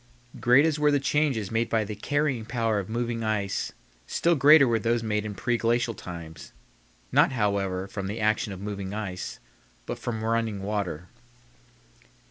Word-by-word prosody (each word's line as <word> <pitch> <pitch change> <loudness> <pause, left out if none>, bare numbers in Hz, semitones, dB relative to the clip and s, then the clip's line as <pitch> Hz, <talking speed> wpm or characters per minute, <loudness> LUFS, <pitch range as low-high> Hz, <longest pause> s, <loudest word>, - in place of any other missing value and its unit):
Great 125 +5 +5
as 155 -2 +1
were 150 0 +4
the 145 -1 +3
changes 135 -7 0
made 115 0 0
by 110 -1 +2
the 105 +1 -5
carrying 145 -1 0
power 115 -2 0
of 95 - -6
moving 115 0 -2
ice, 105 -3 -1 0.4
still 170 - +2
greater 145 -1 +7
were 115 -1 +2
those 115 +1 0
made 105 -1 0
in 105 - -6
preglacial 115 +2 0
times; 85 -4 -9 0.6
not, - - +4
however, 100 -4 0
from 100 0 -5
the 105 +3 -4
action 110 +1 +1
of 95 - -7
moving 100 -1 -5
ice, 95 -4 -5 0.5
but - - -5
from 110 -2 -4
running 110 -3 -1
water. 95 -5 -3
110 Hz, 160 wpm, -26 LUFS, 100-120 Hz, 0.6 s, greater